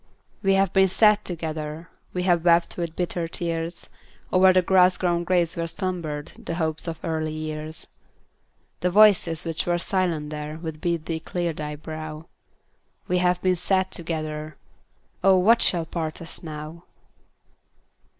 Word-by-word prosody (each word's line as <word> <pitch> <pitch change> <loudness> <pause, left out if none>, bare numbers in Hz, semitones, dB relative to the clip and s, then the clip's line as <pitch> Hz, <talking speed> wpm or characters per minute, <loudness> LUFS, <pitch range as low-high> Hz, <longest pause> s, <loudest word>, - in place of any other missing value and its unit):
We 195 -1 +3
have 195 -2 +2
been 190 0 +5
sad 210 +2 +4
together; 160 -1 -5 0.2
We 180 - -2
have 175 -3 +2
wept 170 -1 +3
with 170 -2 -4
bitter 175 -1 -2
tears 165 0 -3 0.5
O'er 185 0 +7
the 185 0 +3
grass 180 0 +5
grown 175 -1 0
graves 175 -2 +1
where 165 0 -2
slumbered 165 -5 -4
The 165 - -3
hopes 160 -1 -2
of 165 -1 -3
early 155 -1 -2
years. 155 0 -6 0.9
The 180 - +1
voices 185 -5 +5
which 165 -1 -2
are 175 0 +2
silent 170 -5 -1
there 150 0 -5
Would 160 -2 -7
bid 170 -2 -1
thee 165 -1 -2
clear 175 +1 -2
thy 150 -1 -5
brow; 155 +1 -7 0.8
We 180 - +1
have 180 0 +1
been 185 -1 +3
sad 190 +1 +1
together. 155 -2 -4 0.7
Oh, 190 0 +6
what 225 +6 +5
shall 170 -3 +2
part 160 -1 -4
us 165 -1 -6
now? 155 +1 -8
170 Hz, 150 wpm, -24 LUFS, 155-180 Hz, 0.9 s, O'er